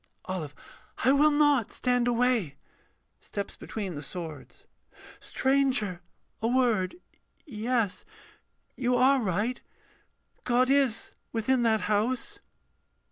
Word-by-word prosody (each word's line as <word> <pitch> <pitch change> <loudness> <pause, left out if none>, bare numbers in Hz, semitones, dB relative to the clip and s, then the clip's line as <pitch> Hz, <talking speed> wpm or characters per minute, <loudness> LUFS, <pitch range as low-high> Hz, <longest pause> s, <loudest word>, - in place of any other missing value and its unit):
OLIVE. 160 -6 -5 0.5
I 260 - +6
will 290 +2 +5
not 290 -6 +3
stand 245 -1 +1
away! 240 - +1 0.6
[Steps 200 -1 -6
between 200 -5 -5
the 145 - -6
swords.] 155 -1 -8 0.6
Stranger, 260 -9 0 0.4
a 225 - +1
word, 235 - +1 0.5
Yes 230 - -1 0.7
you 250 -1 +1
are 260 +2 +4
right 210 +5 -1 0.8
God 250 +1 +2
is 270 -5 +1 0.2
within 240 +3 +1
that 225 -2 +2
house. 245 - -1
240 Hz, 100 wpm, -28 LUFS, 205-260 Hz, 0.8 s, I